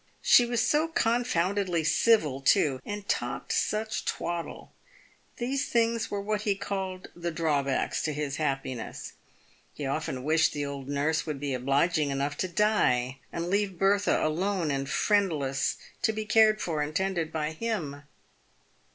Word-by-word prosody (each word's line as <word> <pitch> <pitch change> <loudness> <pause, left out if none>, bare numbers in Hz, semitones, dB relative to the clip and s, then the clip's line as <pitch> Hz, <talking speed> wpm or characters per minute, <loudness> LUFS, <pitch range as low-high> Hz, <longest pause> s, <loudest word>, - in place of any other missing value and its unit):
She 245 - +6
was 240 -1 +1
so 305 +2 +2
confoundedly 200 - +1
civil, 155 - +3
too, 135 0 +3
and 205 -1 -6
talked - - -2
such 215 +1 -1
twaddle. 170 -1 -4 0.6
These 265 +3 -2
things 230 -1 +1
were 205 - -2
what 210 +1 -2
he 205 -2 +1
called 190 -2 -4
the 175 0 -3
drawbacks 150 -5 0
to 155 - -1
his 145 -1 -3
happiness. 135 -5 -3 0.6
He 145 - -5
often 135 -2 -3
wished 160 +3 +3
the 145 -1 -2
old 140 -1 -6
nurse 150 +4 0
would 150 -3 -3
be 140 -1 -2
obliging 140 +5 +1
enough 140 +1 -1
to 185 - -1
die 135 - +1
and 170 +1 -3
leave 200 -2 0
Bertha, 200 +2 +2
alone 175 +1 0
and 135 0 -2
friendless, 155 -10 +1 0.2
to - - +2
be 215 0 -4
cared 215 0 +4
for 155 -3 -1
and 150 +1 -3
tended 185 -4 0
by 155 -1 -2
him. 160 -7 -3
170 Hz, 150 wpm, -28 LUFS, 145-205 Hz, 0.6 s, She